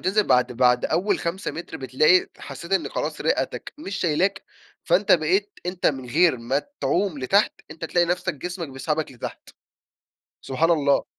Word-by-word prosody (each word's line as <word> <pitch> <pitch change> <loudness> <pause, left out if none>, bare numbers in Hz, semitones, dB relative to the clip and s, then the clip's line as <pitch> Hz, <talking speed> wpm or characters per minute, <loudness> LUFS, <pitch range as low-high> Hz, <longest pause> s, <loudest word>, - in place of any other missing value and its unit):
بتنزل 200 +3 +2
بعد 125 0 +3
بعد 125 0 +3
أول 195 +4 +1
5 175 +4 -3
مِتر، 160 +4 -7
بتلاقي 135 +8 +3
حسِّيت 170 +2 -8
إن 195 - +1
خلاص - - -3
رِئَتك - - -1
مش 200 -10 -5
شايلاك، 185 +4 +1 0.4
فأنتَ 190 +4 +3
بقيت 185 +5 +2
أنتَ 180 0 -1
من 130 -3 0
غير 165 -1 +4
ما 130 +5 -1 0.2
تعوم 185 -4 0
لتحت، 195 +11 +3 0.2
أنتَ 160 +1 -7
تلاقي 175 +1 +2
نفسَك 180 0 -1
جسمك 175 +2 -5
بيسحبك 145 +3 -3
لتحت. 120 - -8 0.9
سبحان 160 +6 +1
الله. 145 -4 +3
170 Hz, 155 wpm, -24 LUFS, 135-185 Hz, 0.9 s, غير